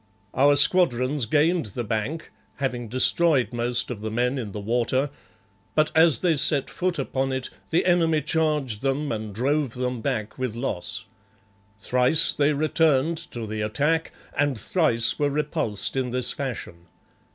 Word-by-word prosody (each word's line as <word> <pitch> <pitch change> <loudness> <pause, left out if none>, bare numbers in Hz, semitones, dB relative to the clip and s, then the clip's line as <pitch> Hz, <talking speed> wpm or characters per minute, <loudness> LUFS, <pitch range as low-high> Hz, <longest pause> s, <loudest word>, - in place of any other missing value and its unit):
Our 145 +2 +4
squadrons 140 -4 +4
gained 155 +2 +1
the 120 +4 -5
bank, 115 +9 -4 0.2
having 125 -4 -3
destroyed 130 +3 +2
most 120 +1 0
of 110 -4 -6
the 110 - -4
men 125 +4 -1
in 110 -5 -6
the 105 - -6
water, 120 +6 -1 0.6
but 155 0 +2
as 160 -2 +5
they 170 -4 +2
set 140 0 +3
foot 180 -1 -2
upon 135 -1 -2
it 130 -1 -4 0.2
the 165 - +1
enemy 165 -4 +2
charged 150 -9 0
them 140 +2 -1
and 110 -1 -4
drove 135 +4 -1
them 125 -1 -3
back 115 -3 -3
with 130 -4 -3
loss. 115 -3 -3 0.7
Thrice 125 +8 +3
they 145 0 +2
returned 155 +1 +1
to 115 -2 -6
the 110 0 -5
attack, 150 +10 -1 0.2
and 145 -3 0
thrice 115 - +1
were 145 -1 +1
repulsed 140 -9 -2
in 130 -1 -1
this 125 +1 +1
fashion. 110 -10 -6
130 Hz, 150 wpm, -24 LUFS, 120-150 Hz, 0.7 s, as